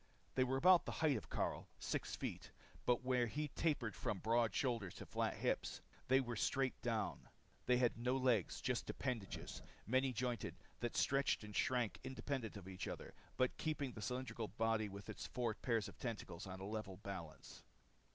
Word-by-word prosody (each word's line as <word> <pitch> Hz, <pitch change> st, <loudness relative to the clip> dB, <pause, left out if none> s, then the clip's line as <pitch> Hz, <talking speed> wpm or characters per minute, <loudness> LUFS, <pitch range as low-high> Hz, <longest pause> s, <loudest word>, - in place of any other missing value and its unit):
They 130 Hz, -, +4 dB
were 130 Hz, +1 st, +1 dB
about 180 Hz, +4 st, +7 dB
the -, -, -2 dB
height 155 Hz, -4 st, +3 dB
of -, -, -4 dB
Karyl -, -, -1 dB
six -, -, -2 dB
feet. -, -, -4 dB, 0.4 s
But 125 Hz, 0 st, +4 dB
where 125 Hz, -2 st, +3 dB
he 150 Hz, +6 st, -2 dB
tapered 135 Hz, -8 st, 0 dB
from 105 Hz, -, -1 dB
broad 115 Hz, +3 st, +3 dB
shoulders 115 Hz, -8 st, 0 dB
to -, -, -7 dB
flat -, -, 0 dB
hips, -, -, 0 dB, 0.3 s
they 130 Hz, +1 st, +6 dB
were 120 Hz, -3 st, -2 dB
straight 130 Hz, +4 st, +2 dB
up -, -, -31 dB
and -, -, -33 dB
down. 115 Hz, -2 st, -1 dB, 0.4 s
They 125 Hz, -, +6 dB
had 120 Hz, -2 st, +3 dB
no 125 Hz, +2 st, +2 dB
legs, 125 Hz, -8 st, +2 dB
just -, -, 0 dB
appendages, 120 Hz, -8 st, -3 dB, 0.2 s
many 130 Hz, +3 st, +3 dB
jointed 125 Hz, 0 st, -1 dB, 0.2 s
that 120 Hz, -1 st, -2 dB
stretched 135 Hz, -4 st, +3 dB
and 105 Hz, -1 st, -8 dB
shrank 120 Hz, -6 st, +2 dB
independent 130 Hz, -4 st, -3 dB
of 100 Hz, -, -9 dB
the 95 Hz, -1 st, -8 dB
other, -, -, -6 dB, 0.2 s
but 130 Hz, 0 st, +2 dB
keeping 150 Hz, -4 st, -1 dB
the 110 Hz, -, -8 dB
cylindrical 125 Hz, 0 st, -2 dB
body 110 Hz, -1 st, +1 dB
with 100 Hz, +1 st, -8 dB
its -, -, -5 dB
four 120 Hz, -2 st, 0 dB
pairs 115 Hz, -2 st, 0 dB
of 100 Hz, -, -11 dB
tentacles 105 Hz, -8 st, -4 dB
on 95 Hz, 0 st, -6 dB
a 95 Hz, -, -5 dB
level 105 Hz, -3 st, -4 dB
balance. 95 Hz, -6 st, -7 dB
120 Hz, 185 wpm, -41 LUFS, 105-130 Hz, 0.4 s, about